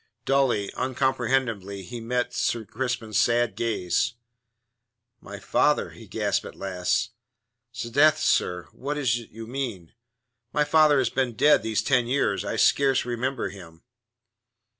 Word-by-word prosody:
Dully, 135 Hz, -7 st, +1 dB
uncomprehendingly 125 Hz, -6 st, -1 dB
he 120 Hz, +6 st, -7 dB
met 125 Hz, +1 st, -2 dB
Sir 115 Hz, -2 st, -1 dB
Crispin's 120 Hz, -2 st, -2 dB
sad 120 Hz, -1 st, +2 dB
gaze. 115 Hz, +1 st, -1 dB, 1.0 s
"My -, -, -9 dB
father," -, -, +1 dB
he -, -, -13 dB
gasped -, -, -1 dB
at -, -, -10 dB
last. 95 Hz, +4 st, -1 dB, 0.6 s
"'Sdeath, 135 Hz, +6 st, +3 dB
sir, 90 Hz, -, 0 dB
what 145 Hz, +3 st, -4 dB
is 120 Hz, -4 st, +1 dB
it 115 Hz, -, -12 dB
you 115 Hz, +1 st, -9 dB
mean? 115 Hz, -9 st, -5 dB, 0.6 s
My 150 Hz, -, +3 dB
father 150 Hz, -1 st, +4 dB
has 130 Hz, -, +1 dB
been 130 Hz, -3 st, -1 dB
dead 150 Hz, +6 st, +5 dB
these 110 Hz, -1 st, -1 dB
ten 125 Hz, -3 st, +2 dB
years. 135 Hz, +3 st, 0 dB
I -, -, -3 dB
scarce 135 Hz, -2 st, +3 dB
remember 125 Hz, -1 st, -2 dB
him." 85 Hz, -4 st, -13 dB
120 Hz, 135 wpm, -25 LUFS, 110-135 Hz, 1.0 s, dead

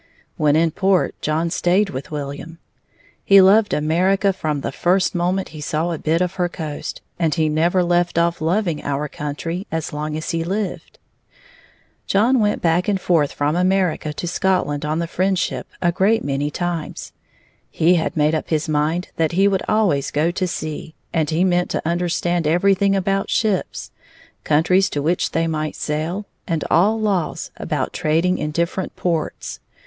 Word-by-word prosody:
When 150 Hz, -1 st, +2 dB
in 165 Hz, +1 st, +3 dB
port, 190 Hz, +1 st, +1 dB
John 160 Hz, +2 st, 0 dB
stayed 190 Hz, +4 st, +2 dB
with 130 Hz, +1 st, -6 dB
William. 145 Hz, +2 st, -6 dB, 0.7 s
He 200 Hz, 0 st, +7 dB
loved 200 Hz, +3 st, +5 dB
America 185 Hz, +6 st, +2 dB
from 155 Hz, -6 st, -2 dB
the -, -, -3 dB
first 185 Hz, +1 st, +1 dB
moment 180 Hz, +2 st, -1 dB
he 155 Hz, -, -9 dB
saw 160 Hz, +3 st, -1 dB
a 165 Hz, -, -3 dB
bit 165 Hz, +2 st, +1 dB
of 180 Hz, -1 st, 0 dB
her 175 Hz, -, +1 dB
coast, 155 Hz, -4 st, -6 dB, 0.2 s
and 160 Hz, -4 st, +1 dB
he 160 Hz, -1 st, +2 dB
never 170 Hz, +4 st, +2 dB
left 175 Hz, 0 st, +1 dB
off 170 Hz, -1 st, +1 dB
loving 170 Hz, -1 st, 0 dB
our 145 Hz, +1 st, -2 dB
country 150 Hz, +6 st, -5 dB
as 160 Hz, -2 st, -3 dB
long 150 Hz, +1 st, -3 dB
as 155 Hz, -, -4 dB
he 165 Hz, -1 st, -1 dB
lived. 195 Hz, +2 st, -4 dB, 1.1 s
John 235 Hz, +6 st, +3 dB
went 210 Hz, -1 st, 0 dB
back 170 Hz, +1 st, +2 dB
and 200 Hz, -2 st, +1 dB
forth 165 Hz, -6 st, +2 dB
from 145 Hz, +2 st, -1 dB
America 180 Hz, -4 st, +1 dB
to 150 Hz, -, -5 dB
Scotland 170 Hz, -6 st, 0 dB
on 155 Hz, +1 st, -1 dB
the 170 Hz, -, -1 dB
Friendship 185 Hz, +2 st, -1 dB, 0.2 s
a 175 Hz, -, +3 dB
great 205 Hz, +6 st, +2 dB
many 140 Hz, +1 st, -1 dB
times. 175 Hz, 0 st, -4 dB, 0.6 s
He 170 Hz, +3 st, +3 dB
had 165 Hz, -2 st, 0 dB
made 150 Hz, +1 st, +3 dB
up 155 Hz, -, -2 dB
his 155 Hz, 0 st, 0 dB
mind 155 Hz, +4 st, 0 dB
that 160 Hz, 0 st, +1 dB
he 195 Hz, +3 st, +4 dB
would 195 Hz, -2 st, +1 dB
always 185 Hz, -11 st, +2 dB
go 155 Hz, +4 st, +1 dB
to 185 Hz, +1 st, -1 dB
sea, 155 Hz, -1 st, -5 dB, 0.2 s
and 160 Hz, -3 st, +1 dB
he 165 Hz, +2 st, +1 dB
meant 180 Hz, -1 st, +1 dB
to -, -, -2 dB
understand 175 Hz, -1 st, 0 dB
everything 195 Hz, +4 st, +3 dB
about 195 Hz, +1 st, 0 dB
ships, 210 Hz, -5 st, -1 dB, 0.5 s
countries 180 Hz, +6 st, +3 dB
to 145 Hz, -, -3 dB
which 170 Hz, +4 st, +1 dB
they 165 Hz, 0 st, 0 dB
might 155 Hz, -2 st, -2 dB
sail, 160 Hz, +7 st, -3 dB, 0.2 s
and 165 Hz, -3 st, -1 dB
all 205 Hz, +7 st, +4 dB
laws 195 Hz, -7 st, -1 dB
about -, -, -2 dB
trading 165 Hz, +4 st, +1 dB
in 150 Hz, -, -2 dB
different 170 Hz, +4 st, -2 dB
ports. 170 Hz, -3 st, -3 dB
170 Hz, 170 wpm, -20 LUFS, 155-185 Hz, 1.1 s, He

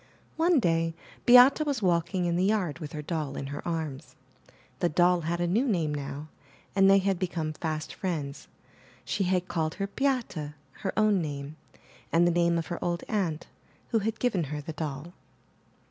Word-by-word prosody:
One 330 Hz, -1 st, +4 dB
day 165 Hz, -4 st, +1 dB, 0.3 s
Beate 250 Hz, +5 st, +8 dB
was 280 Hz, -7 st, -2 dB
walking 175 Hz, 0 st, +1 dB
in 170 Hz, -1 st, +1 dB
the 180 Hz, -, +2 dB
yard 190 Hz, -7 st, 0 dB
with 150 Hz, -3 st, -7 dB
her 150 Hz, -1 st, -5 dB
doll 150 Hz, -3 st, -3 dB
in -, -, -4 dB
her -, -, -5 dB
arms. 160 Hz, -5 st, -4 dB, 0.6 s
The 175 Hz, -, +2 dB
doll 175 Hz, +2 st, +3 dB
had 170 Hz, +2 st, -2 dB
a 175 Hz, -, +1 dB
new 220 Hz, +10 st, +1 dB
name 165 Hz, -9 st, 0 dB
now, 145 Hz, +1 st, -5 dB, 0.5 s
and 195 Hz, -1 st, +6 dB
they 195 Hz, -, +7 dB
had 195 Hz, -2 st, +1 dB
become 170 Hz, -4 st, -2 dB
fast 155 Hz, 0 st, -4 dB
friends. 155 Hz, -7 st, -4 dB, 0.6 s
She 200 Hz, -2 st, -1 dB
had 180 Hz, 0 st, +1 dB
called 160 Hz, -1 st, -1 dB
her 195 Hz, -, -2 dB
Beate, 255 Hz, 0 st, 0 dB, 0.4 s
her 190 Hz, -, -4 dB
own 215 Hz, -3 st, +4 dB
name, 145 Hz, -1 st, -5 dB, 0.6 s
and 170 Hz, +1 st, +4 dB
the 175 Hz, -, +4 dB
name 170 Hz, 0 st, +2 dB
of 165 Hz, -, -2 dB
her -, -, -5 dB
old 170 Hz, -1 st, -1 dB
aunt 175 Hz, -7 st, -1 dB, 0.4 s
who 225 Hz, -, +2 dB
had 220 Hz, +1 st, -2 dB
given 205 Hz, -10 st, +1 dB
her 150 Hz, +1 st, -4 dB
the 150 Hz, +2 st, -6 dB
doll. 150 Hz, +2 st, -5 dB
175 Hz, 180 wpm, -28 LUFS, 155-195 Hz, 0.6 s, Beate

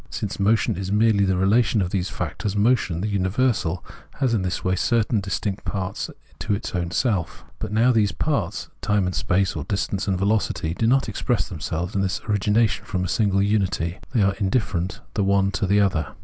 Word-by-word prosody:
Since 100 Hz, -1 st, -4 dB
motion 105 Hz, -2 st, +2 dB
is 95 Hz, 0 st, -4 dB
merely 105 Hz, -1 st, +3 dB
the 95 Hz, -1 st, +1 dB
relation 105 Hz, +4 st, +3 dB
of 90 Hz, -2 st, -1 dB
these 95 Hz, 0 st, -1 dB
factors, 105 Hz, -2 st, -3 dB
motion, 100 Hz, -6 st, +2 dB
the 105 Hz, -, -1 dB
universal, 100 Hz, -2 st, 0 dB, 0.3 s
has 130 Hz, -4 st, +1 dB
in 110 Hz, -, +1 dB
this 90 Hz, -1 st, -2 dB
way 95 Hz, 0 st, +1 dB
certainly 110 Hz, +2 st, +1 dB
distinct 95 Hz, +1 st, -3 dB
parts 95 Hz, -1 st, -3 dB, 0.4 s
in 105 Hz, -, +4 dB
its 105 Hz, -, -5 dB
own 85 Hz, -2 st, -1 dB
self. 95 Hz, -4 st, -1 dB
But -, -, -4 dB
now 115 Hz, +4 st, +4 dB
these 105 Hz, -5 st, +2 dB
parts, 80 Hz, -, -2 dB
time 105 Hz, -2 st, +1 dB
and 90 Hz, -, -2 dB
space, 95 Hz, +2 st, +1 dB
or -, -, -3 dB
distance 100 Hz, 0 st, -2 dB
and 95 Hz, -2 st, +1 dB
velocity, 100 Hz, -4 st, 0 dB
do 110 Hz, +5 st, 0 dB
not 135 Hz, +3 st, +3 dB
express 120 Hz, -5 st, -1 dB
in 90 Hz, -, -5 dB
themselves 85 Hz, +4 st, -3 dB
this 95 Hz, -1 st, 0 dB
origination 105 Hz, +2 st, +2 dB
from 90 Hz, -1 st, -2 dB
a -, -, -1 dB
single 100 Hz, 0 st, +2 dB
unity. 95 Hz, -4 st, 0 dB
They 115 Hz, -6 st, +2 dB
are 100 Hz, 0 st, +3 dB
indifferent 100 Hz, -1 st, -1 dB
the 105 Hz, -, 0 dB
one 100 Hz, 0 st, +2 dB
to 95 Hz, 0 st, -1 dB
the 100 Hz, +2 st, +3 dB
other. 95 Hz, -7 st, +1 dB
100 Hz, 195 wpm, -23 LUFS, 95-110 Hz, 0.4 s, in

